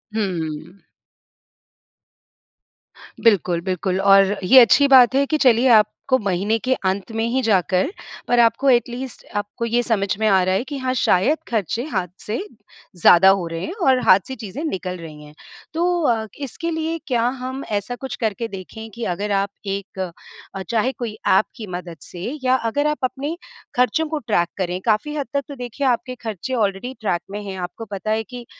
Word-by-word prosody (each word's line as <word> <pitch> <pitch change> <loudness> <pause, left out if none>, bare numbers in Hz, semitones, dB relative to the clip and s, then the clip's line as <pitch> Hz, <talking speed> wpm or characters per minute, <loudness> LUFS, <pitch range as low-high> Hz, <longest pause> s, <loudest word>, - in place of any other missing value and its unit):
हुँ। 175 -3 -3 2.4
बिल्कुल, 180 -6 +3
बिल्कुल, 185 +1 -1
और 195 0 +5
ये 260 +8 +8
अच्छी 270 +4 +6
बात 260 -1 +7
है 280 +1 +3
कि 310 +2 0
चलिए, 250 -2 +4
आपको 225 +3 +3
महीने 200 +3 0
के 260 - +3
अंत 195 +4 -1
में 225 0 -2
ही 260 +2 +1
जाकर, 190 - +2 0.4
पर 245 - +3
आपको 235 +4 +3
एटलीस्ट 245 +1 -1
आपको 205 +3 -3
ये 235 +1 +1
समझ 215 -4 0
में 220 - +2
आ 190 -3 +4
रहा 185 +1 +1
है 200 - 0
कि, 285 +2 -6
"हाँ, 255 -1 -1
शायद 255 - +3
खर्चे 225 +1 -1
हाथ 185 -2 0 0.2
से 215 - -2 0.6
ज़्यादा 175 +2 +6
हो 175 - -4
रहे 165 +1 -5
हैं 350 - -5
और 260 -1 +5
हाथ 185 - +6
से 265 - -5
चीज़ें 220 - -7
निकल 185 - -3
रही 155 -3 -10
हैं।" 150 - -14 0.4
तो 350 +1 +1
अ, 225 -2 0 0.2
इसके 335 +6 -5
लिए 320 +1 -2
क्या 240 -4 +1 0.2
हम 260 +2 -5
ऐसा 210 +4 -2
कुछ 265 +1 -6
करके 225 +1 -1
देखें 220 +3 -9
कि 235 - -6
अगर 205 +3 -3
आप 200 0 -1 0.2
एक 195 -1 -5
अ, 185 +2 -8
चाहे 235 +3 +1
कोई 225 -3 -6
ऐप 190 - +4
की 215 -3 -8
मदद 175 -2 -7
से 175 0 -10 0.2
या 255 0 +3
अगर 290 +6 0
आप 300 - 0
अपने 280 +5 -2 0.4
खर्चों 255 +6 +2
को 310 0 -3
ट्रैक 175 -6 +2
करें, 180 -1 -2
काफ़ी 230 +7 +1
हद 285 -4 -3
तक 280 - +1
तो 285 - -8
देखिए, 250 +2 -3
आपके 255 +1 0
खर्चे 225 +3 -5
ऑलरेडी 215 +2 -1
ट्रैक 175 -5 0
में 205 +1 -5
हैं। 195 -1 -6
आपको 180 +6 -6
पता 205 +3 -3
है 220 0 0
कि 245 +1 -10
220 Hz, 185 wpm, -21 LUFS, 190-255 Hz, 2.4 s, ये